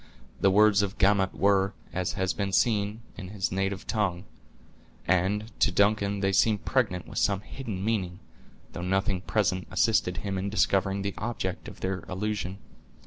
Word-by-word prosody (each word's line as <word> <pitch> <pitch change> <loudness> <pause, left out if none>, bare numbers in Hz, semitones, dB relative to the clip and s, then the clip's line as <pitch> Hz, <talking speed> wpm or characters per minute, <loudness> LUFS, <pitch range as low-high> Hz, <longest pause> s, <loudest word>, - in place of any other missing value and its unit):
The 95 - +4
words 105 +1 +5
of 100 0 -3
Gamut 95 -1 +3
were, 100 0 +2 0.2
as 90 -1 -1
has 95 0 0
been 100 -1 -2
seen, 105 +1 +1 0.2
in 95 - -7
his 95 -1 -3
native 95 0 -2
tongue; 100 -5 -1 0.8
and 95 +5 +1
to - - +4
Duncan 100 +1 +2
they 95 -1 +2
seem 105 +2 +4
pregnant 105 -8 -1
with - - -3
some 100 -1 +1
hidden 110 -5 -6
meaning, 95 -6 -1 0.6
though - - -5
nothing 95 0 0
present 95 -3 0
assisted 95 -1 +2
him 95 +2 -3
in 100 +2 -2
discovering 100 -1 +1
the 100 - -2
object 105 -5 -3
of - - -11
their 95 0 -1
allusion. 95 -1 -3
100 Hz, 160 wpm, -27 LUFS, 95-105 Hz, 0.8 s, words